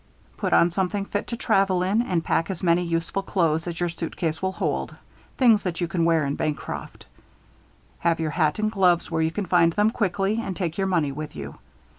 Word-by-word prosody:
Put - - -2
on 170 - +5
something 195 +2 -1
fit 205 0 -3
to 235 - -4
travel 195 -5 +2
in 200 +5 +2
and 180 -8 -1
pack 165 - +1
as 190 -2 -5
many 170 0 +3
useful 170 +2 -1
clothes 170 -4 0
as 170 -1 -4
your 175 - +1
suitcase 165 -1 -3
will 190 0 -1
hold - - -2 0.4
things 230 -5 +5
that 180 -3 -3
you 175 - 0
can 170 -1 0
wear 165 -3 +3
in 140 - -1
Bancroft. 150 -4 -4 0.9
Have 165 -1 +1
your 160 -1 -1
hat 155 -1 +1
and 215 0 0
gloves 180 -5 +2
where 160 0 0
you 160 - +2
can 200 +5 -3
find 170 -2 +3
them 210 +4 +3
quickly 205 -1 0
and 190 -5 -4
take 170 -4 -2
your 195 - +1
money 165 -7 +1
with 150 +2 -7
you. 70 -1 -8
175 Hz, 210 wpm, -24 LUFS, 165-195 Hz, 0.9 s, on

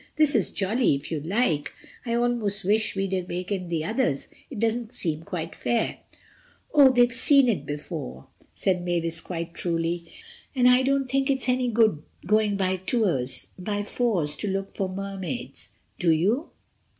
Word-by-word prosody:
"This 305 -2 +3
is 215 -7 +2
jolly 210 - +1
if 140 +4 -7
you 160 - -1
like. 165 - 0 0.4
I 235 - 0
almost 235 -4 0
wish 215 +3 +1
we'd 195 0 -1 0.2
wakened 180 0 -3
the 160 -2 -1
others. 220 - -1 0.2
It - - -8
doesn't 225 +1 -1
seem 160 -3 -1
quite 165 -1 -5
fair." 235 -2 -1 0.7
"Oh, 280 -3 +8
they've 245 -1 +4
seen 275 +2 +5
it 165 - 0
before," 65 - -6 0.4
Mavis 175 -3 0
said, - - -7
quite 170 -1 -5
truly, 170 0 -2 0.4
"and 250 -1 +4
I 250 +1 +6
don't 275 0 +1
think 270 +2 0
it's 265 -2 0
any 250 0 +2
good 220 -8 +3 0.2
going 210 0 +2
by 190 -1 0
fours 190 - -1
to 210 - -3
look 195 0 -3
for 195 -2 -1
Mermaids, 195 +4 -5 0.3
do 175 - +2
you?" 205 - +1
195 Hz, 150 wpm, -26 LUFS, 170-240 Hz, 0.7 s, Oh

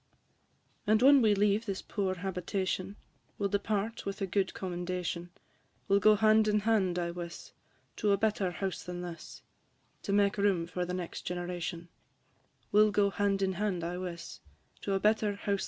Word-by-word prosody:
And 215 +1 +5
when 275 0 +8
we 215 -3 +4
leave 210 +2 +2
this 195 -1 -3
poor 195 -3 -2
habitation, 185 +1 -3 0.4
We 200 - -1
'll - - +1
depart 205 +2 -1
with 195 0 -4
a 195 - 0
good 190 +1 -1
commendation; 180 -1 -3 0.6
We 200 - +4
'll - - +5
go 215 +2 +6
hand 215 0 +4
in 210 0 +2
hand, 200 -5 +2
I 170 -1 -1
wiss, 170 -1 -8 0.5
To 210 - +2
a 200 - +4
better 210 -2 +1
house 190 +1 -4
than 180 0 -6
this, 170 -1 -9 0.6
To - - -4
make 200 0 +2
room 195 -4 +2
for 180 +1 -3
the 180 +1 -3
next 180 -2 -5
generation; 175 -1 -4 0.8
We 210 - +6
'll 215 - +6
go 205 -1 +2
hand 195 -1 +1
in 190 0 +1
hand, 190 -2 -1
I 175 +1 -3
wiss, 170 -2 -6 0.4
&c. 195 -1 0
195 Hz, 170 wpm, -31 LUFS, 180-205 Hz, 0.8 s, when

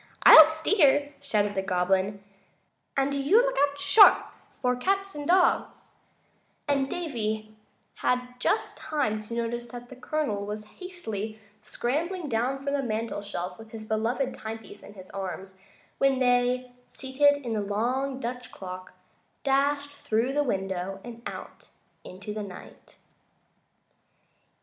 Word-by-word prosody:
"I'll 315 - +12
steer," 310 -3 +2
shouted 210 -7 0
the 190 - 0
Goblin, 190 +2 0 0.7
"and 275 +1 +2
do 280 - -1
you 330 +12 +5
look - - +1
out 285 - -12
sharp 410 +9 +8 0.4
for 250 -1 +1
cats 390 +8 -1
and 290 -1 -6
dogs," 360 0 +2 0.8
and 275 -2 +1
Davy 220 -10 -3 0.4
had 250 0 -1
just 420 - 0
time 240 -9 -1
to 215 +2 -7
notice 235 +1 -3
that 245 +1 -10
the 260 - -10
Colonel 255 -6 -2
was 210 +1 -5
hastily 220 - -5 0.2
scrambling 320 - -2
down 245 +3 0
from 280 +1 -3
the 285 - +1
mantel 225 -3 -3
shelf 180 -3 -5
with 225 0 -12
his 220 -1 -8
beloved 230 +5 -1
timepiece 220 -1 -8
in 205 - -13
his 185 -1 -11
arms, 190 0 -6 0.4
when 275 -1 +3
they, 250 0 +2
seated 280 +3 +2
in 235 - -2
the 215 - 0
long 250 +7 -1
Dutch 250 -1 -5
clock, 185 -1 -8 0.5
dashed 285 +1 +1
through 240 -2 -1
the 295 - +2
window 195 -4 -2
and 235 -1 -9
out - - -9 0.4
into 200 +3 -8
the 215 - -4
night. 195 -3 -11
245 Hz, 140 wpm, -27 LUFS, 210-280 Hz, 0.8 s, I'll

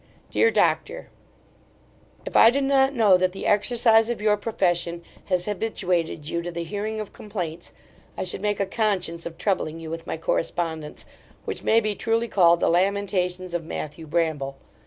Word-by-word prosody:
DEAR 460 - +4
DOCTOR, - - 0 1.2
If - - -7
I 225 - +8
did 275 +3 0
not 270 0 +3
know 210 -6 +5
that 185 0 0
the 195 - -6
exercise 225 +1 +3
of 240 - -2
your 210 0 +3
profession 175 -5 -1 0.2
has 180 -2 0
habituated 180 -7 -2
you 170 +1 -2
to 175 +1 -5
the 170 0 -4
hearing 210 +5 -4
of 215 - -6
complaints, 175 -6 -6 0.5
I - - -2
should 185 0 -4
make 205 -1 -1
a 200 - +1
conscience 190 -5 -1
of 165 - -10
troubling 170 -5 -1
you 160 -1 -7
with 165 0 -6
my - - -3
correspondence, 160 -1 -3 0.4
which - - -4
may 225 - +4
be 215 -2 -1
truly 230 +2 0
called 170 -5 +4
the - - +3
lamentations 185 -1 0
of 175 -1 -2
Matthew 160 0 -6
Bramble. 150 -4 -1
185 Hz, 170 wpm, -24 LUFS, 170-215 Hz, 1.2 s, I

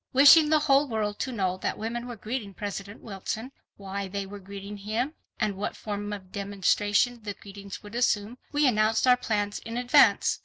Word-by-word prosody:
Wishing 295 +3 +8
the 310 - +5
whole 280 -1 +4
world 215 -3 -2
to 260 - -2
know 190 -5 -1
that - - -3
women 235 +3 -4
were 240 - -6
greeting 215 -2 -5
President 200 +1 -6
Wilson, 220 +4 -5 0.3
why 195 0 -5
they 200 +1 -4
were 200 +1 -9
greeting 200 +1 -8
him, 220 +8 -2 0.3
and 215 -3 0
what 205 +2 -3
form 205 -1 -5
of 190 -3 -7
demonstration 205 +3 +1
the 205 -2 -5
greetings 200 0 -10
would 205 +1 -11
assume, 235 -1 0
we 290 0 +2
announced 220 -1 +2
our 250 -1 +7
plans 210 -4 -2
in 230 +1 -6
advance. 245 0 +4
210 Hz, 185 wpm, -27 LUFS, 200-240 Hz, 0.3 s, Wishing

